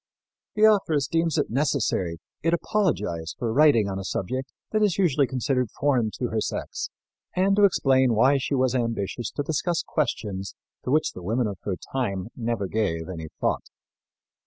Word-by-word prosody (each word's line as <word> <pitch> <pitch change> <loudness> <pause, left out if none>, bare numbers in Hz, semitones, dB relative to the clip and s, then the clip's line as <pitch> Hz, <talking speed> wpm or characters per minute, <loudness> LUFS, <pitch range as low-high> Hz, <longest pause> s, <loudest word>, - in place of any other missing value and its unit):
The 215 - +2
authoress 190 -10 +4
deems 165 -1 0
it - - 0
necessary 120 - 0 0.2
it 165 +2 +2
apologize 105 - -1
for 115 -2 -2
writing 140 -7 +5
on 95 -1 -3
a - - -5
subject 130 +8 -3 0.2
that 215 - +1
is 205 -4 +2
usually 150 -8 +3
considered 125 -1 0
foreign 130 -6 +2
to 125 - -2
her 110 -1 -1
sex - - -3 0.5
and 195 +2 +3
to 205 0 +6
explain 130 - +3
why 135 +5 +4
she 135 +2 -1
was 130 -1 +2
ambitious 115 -2 -2
to 145 - -3
discuss 160 +3 -1
questions 105 - -2 0.3
to - - -2
which 155 +4 +2
the 90 - -10
women 115 +7 0
of 100 -3 -4
her 100 - -1 0.2
time 110 -6 -2
never 115 -4 -2
gave 90 -5 -1
any 80 -3 -6
thought. - - -1
130 Hz, 170 wpm, -25 LUFS, 105-150 Hz, 0.5 s, to